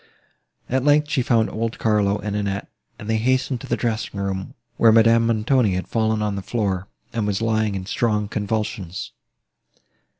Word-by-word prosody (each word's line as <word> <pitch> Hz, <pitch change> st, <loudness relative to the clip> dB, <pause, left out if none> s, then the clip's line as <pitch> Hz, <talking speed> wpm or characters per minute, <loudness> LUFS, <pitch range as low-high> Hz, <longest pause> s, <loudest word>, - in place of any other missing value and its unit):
At 130 Hz, +1 st, 0 dB
length 150 Hz, +1 st, +3 dB
she 135 Hz, -, +2 dB
found 115 Hz, -3 st, +2 dB
old 115 Hz, +1 st, -3 dB
Carlo 105 Hz, -2 st, +2 dB
and 105 Hz, -1 st, -4 dB
Annette, 100 Hz, -1 st, -2 dB, 0.3 s
and 105 Hz, -, -9 dB
they 110 Hz, 0 st, +1 dB
hastened 130 Hz, +1 st, 0 dB
to -, -, -8 dB
the -, -, 0 dB
dressing 110 Hz, -3 st, -2 dB
room, 95 Hz, -1 st, -3 dB, 0.2 s
where 115 Hz, -, +6 dB
Madame 115 Hz, +1 st, +5 dB
Montoni 115 Hz, -2 st, +2 dB
had 95 Hz, -, -3 dB
fallen 110 Hz, -1 st, 0 dB
on 105 Hz, -1 st, -1 dB
the 100 Hz, -, -3 dB
floor, 100 Hz, -3 st, -2 dB, 0.3 s
and 110 Hz, -3 st, -1 dB
was 100 Hz, -1 st, 0 dB
lying 110 Hz, -2 st, 0 dB
in 95 Hz, -1 st, -4 dB
strong 105 Hz, 0 st, 0 dB
convulsions. 105 Hz, -3 st, -3 dB
110 Hz, 170 wpm, -22 LUFS, 100-115 Hz, 0.3 s, where